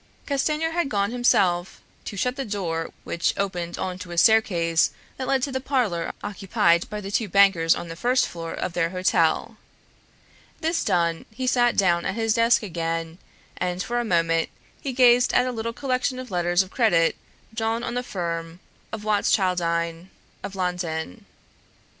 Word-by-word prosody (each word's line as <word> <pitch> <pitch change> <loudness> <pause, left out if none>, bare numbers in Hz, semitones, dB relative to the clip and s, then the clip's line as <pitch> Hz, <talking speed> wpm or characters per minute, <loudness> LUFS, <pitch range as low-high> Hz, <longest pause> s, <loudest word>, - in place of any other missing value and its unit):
Castanier 300 +3 0
had 340 -3 -1
gone 200 -1 0
himself 190 -7 +2 0.3
to 200 - -6
shut 250 +6 0
the 275 - -3
door 175 -7 -3
which 170 0 -1
opened 180 -3 -3
on 185 -1 -4
to 185 - -8
a 175 - -6
staircase 170 -5 +4 0.3
that 260 - -4
led 265 -2 +1
to 280 - -1
the 260 0 -2
parlor 240 -12 0
occupied 190 -4 +1
by 210 - -4
the 200 -1 -7
two 210 0 0
bankers 195 -4 +4
on 170 - -6
the 165 - -7
first 250 +8 +2
floor 165 -1 -6
of 180 - -4
their 165 -1 +1
hotel. 185 +1 +1 1.0
This 330 +2 0
done, 170 -2 0
he 225 +4 -7
had 255 - +2
sat 240 -1 +2
down 175 -3 +3
at 195 - -2
his 225 -1 +1
desk 230 0 +3
again, 165 -2 -3 0.4
and 180 0 -2
for 240 +1 -1
a - - 0
moment 165 -5 +1 0.3
he 275 - -3
gazed 245 -1 +5
at 250 - +4
a 255 - -1
little 230 -1 -3
collection 255 +1 -1
of 255 -3 -8
letters 175 +1 +2
of 190 - -14
credit 175 -9 +3 0.4
drawn 225 +1 -1
on 235 - -3
the 245 - -1
firm 170 -6 -4 0.3
of 220 -1 -6
Watschildine 180 -4 0 0.3
of 195 - -7
London. 175 - -3
195 Hz, 170 wpm, -24 LUFS, 170-240 Hz, 1.0 s, gazed